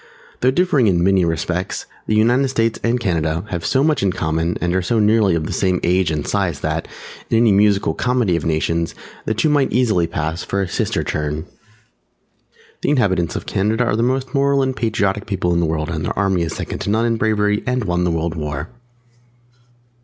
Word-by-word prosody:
Though 130 - +3
differing 145 -4 +2
in 85 -3 +2
many 95 0 +3
respects, 85 +3 -2 0.2
the 110 - +1
United 120 +5 +3
States 115 -3 0
and 120 +1 +1
Canada 85 -5 -1
have 85 -4 -3
so 135 0 +2
much 155 0 +2
in 100 -1 +2
common 80 0 -1
and 85 0 -1
are 95 - +1
so 115 +6 0
nearly 105 -3 +3
of 80 -2 -1
the - - -4
same 90 -2 +1
age 90 0 +2
and 75 -2 -3
size 95 -7 -1
that, 80 +1 -2 0.4
in 115 - +2
any 115 -1 +4
musical 100 0 +3
comedy 125 -7 +1
of 85 - -2
Nations, 85 +1 -1 0.3
the 110 - -1
two 120 +8 +1
might 145 -3 +2
easily 110 -9 +2
pass 80 +1 -3
for 100 - -2
a - - -3
"sister - - -1
turn." 75 +1 -3 1.4
The - - 0
inhabitants 95 - +1
of - - -4
Canada 110 +5 0
are 115 -3 0
the 115 - 0
most 130 +1 -1
Moral 140 0 +2
and 130 -1 -1
Patriotic 105 -3 -1
people 95 -4 0
in 85 - +1
the 85 - +1
World, 80 0 -2
and 80 -2 -3
their - - -3
army 95 -2 +1
is 85 - -2
second - - -5
to - - -3
none 110 +3 +2
in 115 -1 +1
bravery 105 -2 +1
and 125 -1 0
won 90 -2 0
the 90 - +1
World 85 0 -1
War. 75 0 -4
95 Hz, 205 wpm, -19 LUFS, 85-115 Hz, 1.4 s, any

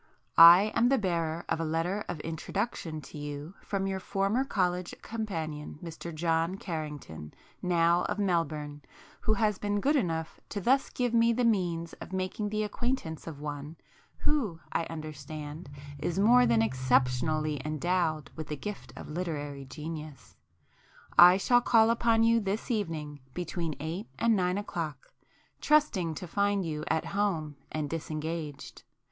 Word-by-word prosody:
I 175 +6 +9
am 240 - +4
the 270 - +4
bearer 170 -5 -1
of - - 0
a - - 0
letter 165 +6 -1
of 175 -3 -4
introduction 165 0 -3
to 150 - -10
you 145 +3 -6
from 195 -1 -2
your 190 0 -1
former 200 +6 0
college 180 -7 -1
companion 160 -11 -4
Mr 170 0 -7
John 165 +2 0
Carrington, 150 - -6 0.3
now 170 -1 +3
of 205 - -2
Melbourne, 155 -6 -1 0.4
who 215 - +1
has 210 -2 +1
been 205 0 0
good 285 +8 +2
enough 165 - -1
to 205 - -3
thus 260 +8 +2
give 245 -2 -1
me 230 0 +5
the 245 +1 +1
means 175 -6 0
of - - -8
making 190 +3 -2
the 215 0 -1
acquaintance 210 - -3
of 155 -3 -7
one, 145 +1 -5 0.4
who, 230 - 0
I 165 - 0
understand, 155 -1 -7 0.3
is 170 +4 -2
more 240 +5 +6
than 115 -1 +4
exceptionally 130 +5 +1
endowed 155 0 0
with 155 - -6
the 150 - -4
gift 210 +6 -6
of - - -8
literary 145 -4 -4
genius. 150 +1 -8 0.8
I 180 +1 +9
shall 245 +5 +4
call 225 -1 +5
upon 230 -1 +3
you 230 0 +5
this 205 +4 -2
evening 160 -9 -2 0.2
between 170 -3 -3
eight 165 +8 -4
and 230 -1 +3
nine 180 -1 +1
o'clock, 165 -7 -5 0.5
trusting 210 - +2
to 180 - -6
find 200 +1 +1
you 155 -1 -3
at 160 - 0
home 170 -8 -1
and 155 -1 -2
disengaged. 155 -1 -5
170 Hz, 150 wpm, -30 LUFS, 155-205 Hz, 0.8 s, I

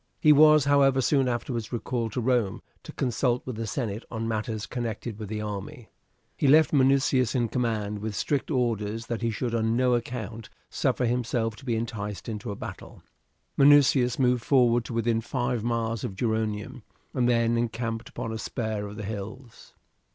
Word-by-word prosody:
He 150 - +6
was, 150 -1 +6
however, 140 -2 +4
soon 135 0 +2
afterwards 120 -2 -3
recalled 120 -2 -3
to 125 - -1
Rome 120 -5 0 0.2
to - - -10
consult 125 0 0
with 130 - -5
the 115 0 -4
senate 110 -3 -3
on 115 -1 -4
matters 110 -1 -2
connected 115 -2 -5
with 105 -3 -6
the 105 0 -3
army. 105 +5 -6 0.5
He 145 - +1
left 155 +1 +5
Minucius 135 -3 +3
in 120 -3 +1
command, 110 -4 -1
with 105 0 -4
strict 140 +5 -1
orders 115 -5 -1
that 115 -1 -4
he 115 - 0
should 115 +2 -3
on 115 0 +1
no 125 0 +3
account 115 -3 -4 0.2
suffer 125 - 0
himself 120 -2 -1
to 135 - -14
be 120 -3 0
enticed 110 -3 -4
into 110 0 -5
a 100 - -4
battle. - - -9 0.5
Minucius 140 -3 +5
moved 125 -3 +2
forward 120 -3 +3
to - - -6
within 115 0 +1
five 120 -1 -2
miles 115 -2 -1
of 95 - -4
Geronium, 110 +3 -2 0.3
and 125 -2 +2
then 115 -1 +2
encamped 115 -1 -2
upon 115 - -5
a 110 - -4
spur 110 -3 -3
of 100 - -9
the 105 -1 -6
hills. 110 +4 -8
115 Hz, 175 wpm, -27 LUFS, 110-125 Hz, 0.5 s, He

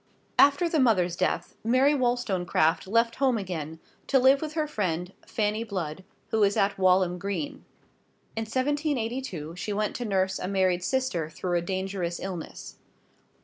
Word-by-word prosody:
After 285 +5 +6
the 325 -2 +1
mother's 185 -9 +3
death, 185 - -1
Mary 255 +6 +4
Wollstonecraft 205 - +1
left 230 +3 +2
home 260 -3 +2
again, 160 -6 -5 0.3
to 275 - +4
live 265 +2 +5
with 310 -1 -4
her 310 -1 0
friend, 180 - -2
Fanny 215 +1 0
Blood, 185 -5 -4 0.3
who 220 - 0
was 205 -1 +3
at 200 0 +1
Walham 185 -1 +3
Green. 200 - -4 0.7
In 225 0 -2
1782 255 - -2
she 195 +4 -4
went 210 +1 -1
to 245 - -4
nurse 190 -2 0
a - - -3
married 185 -2 +1
sister 220 -11 -1
through 175 +2 -3
a 170 - +2
dangerous 185 -1 -3
illness. 185 -4 -7
200 Hz, 150 wpm, -27 LUFS, 180-255 Hz, 0.7 s, After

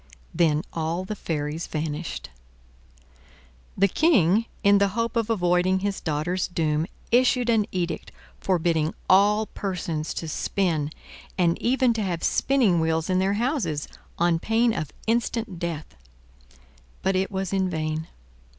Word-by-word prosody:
Then 160 -2 +2
all 165 +3 -2
the 215 - -4
fairies 155 -3 -3
vanished. 155 +1 -4 1.5
The 200 - +5
King, 220 - +3 0.2
in 200 -1 +6
the 200 - +4
hope 230 0 -1
of 230 -1 0
avoiding 185 -2 +2
his 200 -1 -2
daughter's 165 +4 -1
doom, 160 -2 0 0.2
issued 245 0 +3
an 215 -3 +2
edict 180 -2 -3 0.3
forbidding 165 -4 +1
all 205 +3 +5
persons 170 -7 -4
to 165 - -4
spin, 160 -2 -1 0.5
and 170 -2 +3
even 255 0 +3
to 225 - -2
have 175 -4 -2
spinning 240 -11 +3
wheels 160 +2 0
in 185 - +2
their 190 +1 +2
houses, 225 - -1 0.3
on 170 -1 +2
pain 225 +4 +2
of 155 -7 -4
instant 225 -4 -1
death. 165 -3 -4 1.1
But 190 0 +1
it 190 +1 +1
was 190 -1 -3
in 190 -1 +1
vain. 155 -1 -2
185 Hz, 135 wpm, -25 LUFS, 160-210 Hz, 1.5 s, in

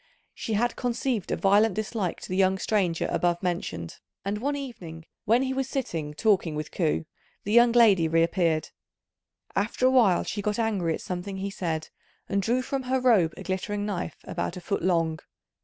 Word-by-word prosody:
She 225 - -4
had 235 +3 +1
conceived 245 -3 -1
a - - +2
violent 205 +1 +3
dislike 215 -3 -2
to - - -9
the 185 - -2
young 190 0 +3
stranger 185 -5 0
above 175 +1 0
mentioned; 170 - -3 0.3
and 205 +1 -1
one 285 +5 -1
evening 180 - -7 0.2
when 235 +5 +4
he 265 0 -1
was 265 -1 -2
sitting 165 - -3
talking 185 -5 +2
with 150 0 -4
Ku, 160 -2 0 0.4
the 205 - -3
young 235 +1 +6
lady 205 -9 +5
reappeared. 165 -1 +1 0.9
After 210 +5 0
a 260 - +5
while 225 -9 +4
she 205 - -3
got 210 0 -1
angry 200 -8 0
at - - -9
something 185 +2 -5
he 195 +1 -3
said, 160 -4 -3 0.4
and 200 - 0
drew 245 +5 +1
from 270 +1 -2
her 260 0 +2
robe 220 -10 +3
a - - -7
glittering 205 +2 -2
knife 195 -4 -3
about - - -4
a - - -7
foot 200 +3 -2
long. 165 -3 +1
195 Hz, 185 wpm, -27 LUFS, 170-230 Hz, 0.9 s, young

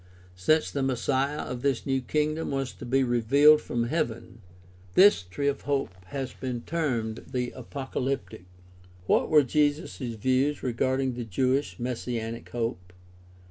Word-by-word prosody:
Since 155 - +2
the 140 - -2
Messiah 135 +2 0
of 125 -1 -5
this 140 -3 0
new 135 -1 0
kingdom 155 +4 -1
was 135 -2 -2
to 125 - -9
be 135 +2 +3
"revealed" 140 +6 +5
from 120 -1 -2
heaven, 120 -4 -3 0.5
this 195 - +6
t>^e 120 +11 -3
of 140 -1 0
hope 140 -5 -1
has 130 +5 -5
been 125 -2 -4
termed 120 -9 -2
the 125 -2 -2
''apocalyptic." 130 -4 -4 0.6
What - - +2
were 150 -2 +6
Jesus' 145 +4 0
views 130 +4 0
regarding 130 +1 0
the 120 0 -4
Jewish 130 +7 0
messianic 120 -2 -4
hope? 115 -7 -4
130 Hz, 140 wpm, -27 LUFS, 120-140 Hz, 0.6 s, this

